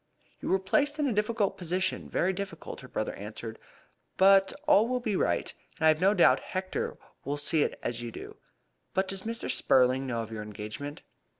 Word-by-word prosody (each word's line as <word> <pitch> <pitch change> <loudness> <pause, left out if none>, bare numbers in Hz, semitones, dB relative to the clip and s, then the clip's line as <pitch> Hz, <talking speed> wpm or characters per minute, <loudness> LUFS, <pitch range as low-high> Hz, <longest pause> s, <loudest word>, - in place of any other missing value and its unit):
"You - - -4
were 190 - +4
placed 290 +10 +1
in 295 -2 +1
a 250 - +1
difficult 210 0 0
position 185 +2 -1
very 185 +2 +1
difficult," 195 +1 -6
her - - -10
brother - - -3
answered. - - -7 0.6
"But 195 0 +6 0.2
all 230 -7 +6
will 250 +1 0
be 220 -4 -1
right, 85 - 0 0.2
and - - 0
I - - +8
have 155 +1 +2
no 195 +3 +4
doubt 175 - +6
Hector 185 0 -3 0.3
will 145 +2 -2
see 150 +2 +1
it - - -1
as 120 0 -2
you 120 - -4
do. - - -9 0.6
But 190 0 +2
does 195 -1 -3
Mr. 230 +1 -4
Spurling 130 +1 +3
know 115 -2 -1
of 110 - -10
your 110 -1 -5
engagement?" 105 +7 -7
185 Hz, 195 wpm, -29 LUFS, 135-205 Hz, 0.6 s, I